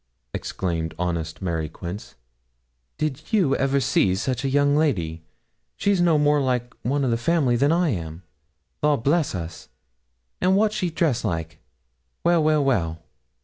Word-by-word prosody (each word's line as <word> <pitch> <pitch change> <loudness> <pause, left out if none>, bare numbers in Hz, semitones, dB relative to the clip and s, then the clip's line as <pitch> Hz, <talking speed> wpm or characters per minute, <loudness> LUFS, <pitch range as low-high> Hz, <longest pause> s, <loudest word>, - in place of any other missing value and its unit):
exclaimed 85 -3 -3
honest 85 -1 -3
Mary 80 -3 -2
Quince, 90 +6 -8 0.8
'Did 155 - -3
you 180 -11 +3
ever 135 +1 +2
see 120 -8 +2
such 120 +5 -2
a 135 - 0
young 145 +1 +3
lady? 90 - 0 0.5
She's 200 -3 +1
no 170 -3 +4
more 150 0 +3
like 125 -2 -1
one 140 +2 0
o' - - +1
the 115 - +2
family 140 -2 +2
than 140 +5 +3
I 170 0 +2
am. 85 - -4 0.6
Law 150 -1 +3
bless 145 - +1
us! 85 -3 -7 0.7
and 185 +1 +4
what's 215 0 +2
she 185 -4 -1
dressed 160 -7 0
like? 80 -6 -3 0.6
Well, 170 -2 +3
well, 155 -2 +3
well!' 85 - 0
135 Hz, 150 wpm, -24 LUFS, -, 0.8 s, no